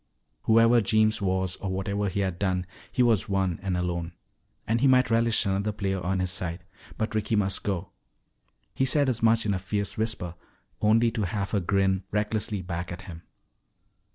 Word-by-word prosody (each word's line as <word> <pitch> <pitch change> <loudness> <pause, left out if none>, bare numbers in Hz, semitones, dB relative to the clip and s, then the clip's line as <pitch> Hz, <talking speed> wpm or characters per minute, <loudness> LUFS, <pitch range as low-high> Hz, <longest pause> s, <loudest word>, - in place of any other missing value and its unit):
Whoever 115 +1 +5
Jeems 110 +1 +2
was 95 -1 0
or 100 - -4
whatever 100 +2 -1
he 100 +2 -2
had 95 -2 -2
done, 95 -2 0 0.3
he 125 - +2
was 115 -6 +2
one 95 -3 0
and 95 -2 -1
alone. 85 -1 -2 0.5
And 115 +2 0
he 140 - +5
might 130 -3 +4
relish 115 0 +3
another 100 +2 0
player 95 -2 -2
on 95 +1 0
his 90 -1 -1
side. 90 0 -4 0.3
But 110 0 -2
Ricky 110 +1 0
must 100 -2 +1
go. 95 -4 -3 0.8
He - - 0
said 140 +1 +3
as 120 -3 -1
much 115 0 +3
in 105 - +1
a 95 - -1
fierce 100 +2 -3
whisper, 110 -6 -2 0.5
only 115 +2 +4
to 110 - -3
have 100 +2 -3
her 105 - +2
grin 95 +1 +1
recklessly 105 -1 -1
back 85 0 -4
at 90 +2 -7
him. 85 -3 -9
100 Hz, 180 wpm, -27 LUFS, 95-110 Hz, 0.8 s, Whoever